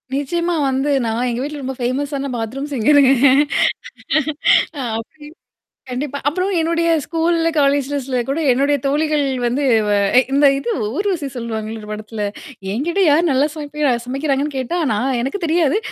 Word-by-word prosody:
நிச்சியமா 340 +5 -1
வந்து 270 +2 0 0.2
நான் 230 +3 -1
எங்க 240 +1 -2
வீட்ல 295 0 -5
ரொம்ப 265 +1 -4
ஃபேமஸ்ஸான 275 +3 -2
பாத்ரூம்ஸ்ங்கருங்க. 270 +3 +2 1.7
அ - - -3 0.2
அப்டி. 295 +6 -11 0.6
கண்டிப்பா. 280 +3 -3
அப்புறம் 365 +6 -2
என்னுடைய 335 +1 +1
ஸ்கூல்ல, 330 +1 +1
காலேஜ்லஸ்ல 275 -2 0
கூட 275 +4 -1
என்னுடைய 280 +3 +2
தோழிகள் 300 +1 +1 0.2
வந்து 250 +5 0 0.2
வ - - +1 0.4
இந்த 285 +1 +4
இது 240 -4 -3 0.2
ஊர்வசி 370 -7 -1
சொல்லுவாங்கல்ல 220 -2 -4
ஒரு 210 - -11
படத்துல. 215 0 -5 0.5
என்கிட்ட 335 - -1
யார் 315 +4 +4
நல்லா 270 +2 +3
சமைப்ப 300 -3 -1
சமைக்கிறாங்கன்னு 275 +2 -1
கேட்டா, 260 +7 -2
நா 210 - 0
ஆனா 265 -1 0
எனக்கு 275 +10 -3
தெரியாது. 320 0 +2
280 Hz, 135 wpm, -19 LUFS, 255-305 Hz, 1.7 s, இந்த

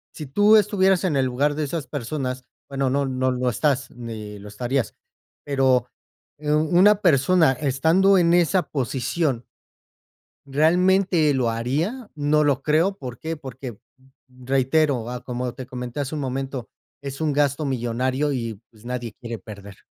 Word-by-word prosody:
Si 150 - -7
tú 205 +9 +5
estuvieras 195 -3 +3
en 170 -6 +1
el 135 -1 +2
lugar 140 +4 0
de 155 - -2
esas 150 +1 -4
personas. 130 -2 -4 0.2
Bueno, 135 -1 -1
no 140 +1 +1
no 130 0 0
lo 125 0 0
estás 135 +1 0
ni 110 -4 -8
lo 100 - -11
estarías. 120 +5 -2 0.5
Pero, 130 -3 +2 0.5
eh, 150 0 -3
u 150 - +4 0.2
una 205 +2 +6
persona 160 -2 +4
estando 160 +9 +3
en 170 -1 +3
esa 175 +1 +3
posición 135 0 -1 1.0
¿realmente 170 +2 +3
lo 125 -3 +1
haría? 155 - -2
No 150 +1 +2
lo 140 -2 +1
creo. 165 +6 +2
¿Por 125 - -7
qué? 160 0 -4
Porque, 130 -5 -8 0.5
reitero, 130 0 0
ah, 125 0 -5
como 125 -1 -4
te 130 0 -8
comenté 125 +1 -5
hace 140 +2 -4
un 150 - -3
momento, 135 -2 -4 0.3
es 140 +1 -6
un 155 -2 +1
gasto 145 +1 +1
millonario 130 +3 -1
y, 115 -5 -4
pues, 110 -2 -21
nadie 120 -2 -4
quiere 115 -1 -6
perder. 100 -2 -11
135 Hz, 155 wpm, -23 LUFS, 125-155 Hz, 1.0 s, una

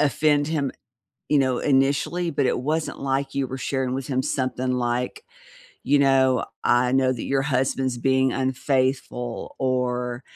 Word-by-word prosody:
offend 145 +1 +2
him, 145 -4 -1 0.6
you 150 - +3
know, 130 -2 +1
initially, 145 +5 +1
but 140 -1 +1
it - - +1
wasn't 155 +4 -2
like 135 0 -1
you 135 -1 +1
were 130 +1 -6
sharing 130 -1 -2
with 135 -1 -4
him 130 -2 0
something 130 -1 -1
like, 125 - -2 0.6
you 145 - +3
know, 130 -2 +3 0.2
I 125 +1 +3
know 130 -1 +3
that 120 - -5
your 135 0 +1
husband's 130 -1 0
being 130 +1 +2
unfaithful 130 -2 -1
or, 125 -1 -1
130 Hz, 150 wpm, -24 LUFS, 125-140 Hz, 0.6 s, you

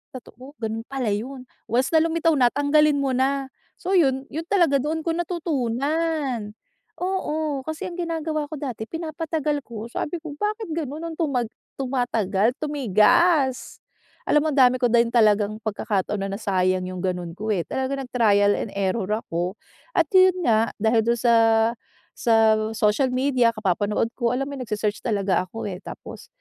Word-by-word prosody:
totoo. 255 +2 -11
Ganun 225 +1 -3
pala 265 -4 -2
yun. 255 +5 -5 0.2
Once 250 +3 +1
na - - +6
lumitaw 330 0 +2
na 245 -2 +5
tanggalin 290 +1 +3
mo 275 - 0
na. 270 +1 0 0.3
So 375 +1 +1
yun, 270 -4 +2
yun 320 +2 -5
talaga 340 -8 +3
doon 315 +2 -2
ko 330 0 -1
natutunan. 295 - -1 0.5
Oo, 315 -6 -1
kasi 315 +2 -4
ang 350 - -9
ginagawa 320 -3 -2
ko - - -8
dati 250 -6 -5
pinapatagal 315 -2 -2
ko 225 -1 -7
sabi 300 +7 -3
ko, 310 -3 -7
"Bakit 425 0 -2
ganun 300 0 -4
nung 325 -1 -6
tuma 280 -7 0 0.4
tumatagal, 240 -5 0
tumigas?" 275 - +2 0.5
alam 300 0 +4
mo, 310 - 0
ang 275 - +1
dami 255 0 +6
ko 245 -1 +2
din 235 -1 +4
talagang 215 -3 +3
pagkakataon 205 -1 -2
na 195 - -2
nasayang 185 -3 0
yung 185 0 -6
ganun 180 -2 -2
ko 215 +2 -5
eh. 180 -5 0
Talagang 270 +1 -2
nag-trial 205 -4 +3
and 210 - -4
error 195 0 -1 0.2
ako 175 +3 -3 0.4
at 335 - +5
yun 370 -1 +6
nga 225 -4 +3
dahil 225 +2 +3
dun 235 +1 +2
sa 235 0 +3 0.8
sa 225 -2 +4 0.2
social 215 +5 +2
media, 255 -3 +2
kapapanood 210 +2 0
ko. 240 -1 +1
Alam 275 +2 -2
mo 285 - -6
yun 255 - -5
nagse-search 210 0 -2
talaga 195 -5 +1
ako 225 - -7
eh, 180 -1 -6
tapos - - -10
255 Hz, 165 wpm, -23 LUFS, 215-305 Hz, 0.8 s, na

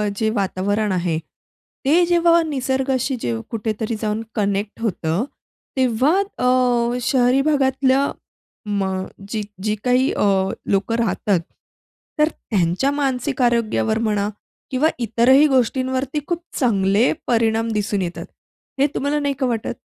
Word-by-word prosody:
जे 220 +2 0
वातावरण 200 +2 0
आहे, 175 -3 0
ते 290 - -2
जेव्हा 340 -1 +4
निसर्गाशी 265 -2 -1
जे 115 - -1 0.2
कुठेतरी 220 0 -2
जाऊन 215 0 -1
कनेक्ट 205 +1 -1
होतं. 175 -3 -1 0.5
तेव्हा 260 +3 +2 0.2
अ, 250 -1 +2
शहरी 255 0 +3
भागातल्या 270 -1 +2 0.6
म 200 -1 0 0.5
जी 215 -2 -2 0.2
जी 215 0 0
काही 250 +1 +3 0.6
लोकं 200 +3 +1
राहतात, 210 -4 +1 0.8
तर 305 +1 +4
त्यांच्या 195 - 0
मानसिक 275 -1 -1
आरोग्यावर 230 -2 +1
म्हणा 205 -1 0 0.4
किंवा 270 +4 +2
इतरही 240 +5 +4
गोष्टींवरती 260 +1 0
खूप 345 -1 -2 0.2
चांगले 205 -2 +3 0.2
परिणाम 225 -1 +2
दिसून 205 -1 -1
येतात 175 -1 -4 0.5
हे 280 - +4
तुम्हाला 285 +2 0
नाही 285 -1 0
का 265 - +1
वाटत? 235 0 -2
240 Hz, 120 wpm, -21 LUFS, 210-265 Hz, 0.8 s, जेव्हा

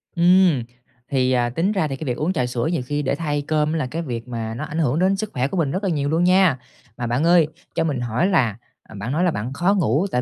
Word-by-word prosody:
Ừm. 175 -5 +4 0.5
Thì, 130 -1 +1
à, 120 -1 +2
tính 170 - 0
ra 190 -7 0
thì 135 - -4
cái 155 - -7
việc 125 -3 -2
uống 165 +5 0
trà 130 -8 0
sữa 120 -1 -2
nhiều 165 -7 -1
khi 145 +3 -2
để 135 - 0
thay 145 -3 -2
cơm 155 0 +1
là 155 -6 -1
cái 165 - -3
việc 120 -6 -5
mà 115 -2 -4
nó 120 - -5
ảnh 160 - -4
hưởng 150 0 +1
đến 190 +2 +3
sức 215 +1 -4
khỏe 130 +1 0
của 190 - -4
mình 150 -5 +1
rất 190 - -3
là 195 - +1
nhiều 145 -4 -1
luôn 165 +2 +1
nha. 180 -5 +4 0.4
Mà 120 - -3
bạn 120 +5 0
ơi, 170 -2 +5 0.3
cho - - +1
mình 145 -6 -1
hỏi 120 - 0
là, 125 - +1 0.3
à, - - -14
bạn 105 +5 -4
nói 160 +5 +1
là 180 - +3
bạn 120 +4 -4
khó 175 +7 +2
ngủ 165 - +1
tại 125 - +1
150 Hz, 280 wpm, -22 LUFS, 125-175 Hz, 0.5 s, ơi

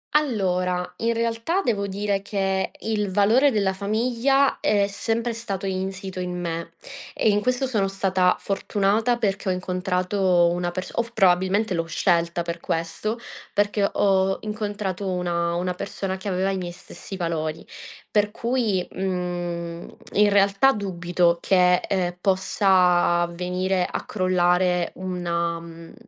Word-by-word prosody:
Allora, 185 -10 0
in 230 +1 0
realtà 230 +10 0
devo 200 -4 0
dire 200 0 -1
che 195 -1 -1
il 210 -3 -1
valore 220 +8 +4
della 205 -6 +1
famiglia 235 +7 +1
è 205 -1 +2
sempre 225 +3 -2
stato 200 -4 -5
insito 190 0 -4
in 180 0 -3
me, 170 -1 -4 0.4
e - - +2
in 205 0 +3
questo 250 +4 0
sono 215 -7 0
stata 190 -2 +2
fortunata 205 +4 0
perché 200 -4 -2
ho 185 - +2
incontrato 180 0 +1
una 175 0 -1
perso 185 +1 -6
o 235 0 +1
probabilmente 190 +1 +3
l'ho 165 -1 -1
scelta 170 0 +1
per 170 0 -4
questo, 165 +8 -2 0.4
perché 205 0 +1
ho 190 -1 +2
incontrato 205 -3 -3
una 175 -2 -1
una 180 +1 -1
persona 190 0 -4
che 190 - -8
aveva 190 0 0
i 195 - -1
miei 175 -2 -5
stessi 195 - -10
valori. 165 -3 -3 0.5
Per 210 -1 +2
cui, 230 -6 0
mhmm, 175 -2 -3 0.3
in 210 0 +5
realtà 200 +6 +4
dubito 175 -4 0
che, 180 0 +4
ehm, 180 -2 -1
possa 180 -2 +3
venire 180 +1 -1
a - - -4
crollare 180 -2 +1
una, 170 -2 -2
mhmm, 165 0 -11
190 Hz, 135 wpm, -24 LUFS, 180-205 Hz, 0.5 s, in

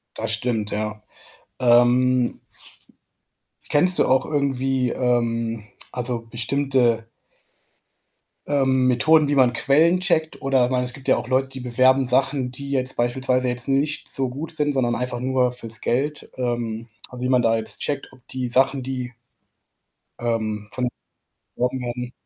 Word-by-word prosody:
Das 110 0 -2
stimmt, 110 -2 -1
ja. 105 0 -3 0.6
Ähm 125 0 +3 1.3
kennst 180 +5 +4
du - - +5
auch 130 0 +2
irgendwie, 135 -3 0
ähm, 115 -3 0 0.3
also 125 -1 -2
bestimmte 120 -1 +1 1.4
ähm, 130 -3 +2
Methoden, 150 +4 +4
wie 145 - +1
man 125 -3 +4
Quellen 160 +9 +3
checkt? 165 -4 0
Oder 135 -2 +3
ich 125 - -3
meine, 125 -1 +1
es 125 - -4
gibt 130 +1 -9
ja - - +5
auch 120 - -5
Leute, 130 +1 +2
die 135 -1 -8
bewerben 130 +2 +3
Sachen, 130 0 +1
die 140 +2 -6
jetzt 130 -2 -1
beispielsweise 125 +1 0
jetzt 120 +1 -1
nicht 140 +2 0
so 135 -1 -1
gut 145 +6 -6
sind, 150 -2 0
sondern 120 -3 +1
einfach 125 0 -3
nur 130 0 +1
fürs 115 -2 -6
Geld, 145 +5 -2
ähm 120 -2 -3 0.3
wie 125 +1 -3
man 125 -1 +3
da 115 0 +3
jetzt 110 -1 0
checkt, 140 -1 -2
ob 130 -2 -21
die 130 -1 -3
Sachen, 135 +2 +2
die 125 -1 -5 1.1
ähm, 110 -3 -2
von 125 -1 -1 0.7
beworben 125 +2 -1
werden. 125 0 -5
125 Hz, 150 wpm, -22 LUFS, 120-135 Hz, 1.4 s, du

